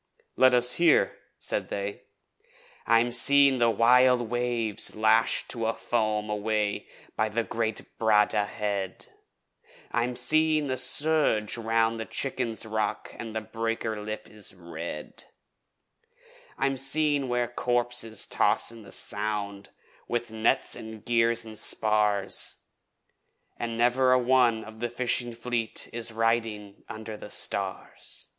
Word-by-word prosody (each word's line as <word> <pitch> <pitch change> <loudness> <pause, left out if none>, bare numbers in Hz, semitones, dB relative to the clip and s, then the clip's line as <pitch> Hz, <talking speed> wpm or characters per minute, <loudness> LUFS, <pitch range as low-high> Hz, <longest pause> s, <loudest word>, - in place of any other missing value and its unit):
'Let 130 -1 +5
us 125 0 +4
hear,' 170 -3 +4 0.2
said - - -3
they. 100 0 -5 0.8
I'm 115 +1 +3
seeing 135 +2 +5
the 120 -1 +4
wild 120 +1 +3
waves 120 -3 -1
lashed 110 +1 +2
to 115 -2 -1
foam 110 -3 -1
away 105 0 -2 0.3
by 110 0 0
great 115 0 -2 0.2
Bradda 105 -2 +2
Head, 100 -4 -4 0.9
I'm 120 +1 -1
seeing 155 +2 +3
the 130 -2 -2
surge 145 -6 +2
round 115 0 0
the 110 - -5
Chicken's 125 -5 -2
Rock 110 -1 -3
an' 115 -2 -7
the 110 - -3
breaker's 115 -1 -4
lip 110 0 -6
is 105 -2 -4
red; 85 -3 -8 1.3
I'm 135 0 0
seeing 140 0 +2
where 120 0 0
corpses 120 -2 -1
toss - - +2
in 115 -1 -12
the 105 - -14
Sound, 105 -1 +1 0.4
with 120 -1 -3
nets 110 0 +2
an' 110 -1 -9
gear 115 0 +2 0.2
an' 110 -1 -10
spars, 105 -2 +1 1.0
An' 115 -1 -5
never 125 +2 +3
a - - +5
one 125 -3 +2
of 110 0 -12
the 120 0 -2
Fishing 120 0 -1
Fleet 115 -1 -2
is 115 0 -3
riding 110 -3 -2
under 110 0 -7
the 105 - -10
stars. 95 -2 -3
115 Hz, 125 wpm, -27 LUFS, 110-120 Hz, 1.3 s, Let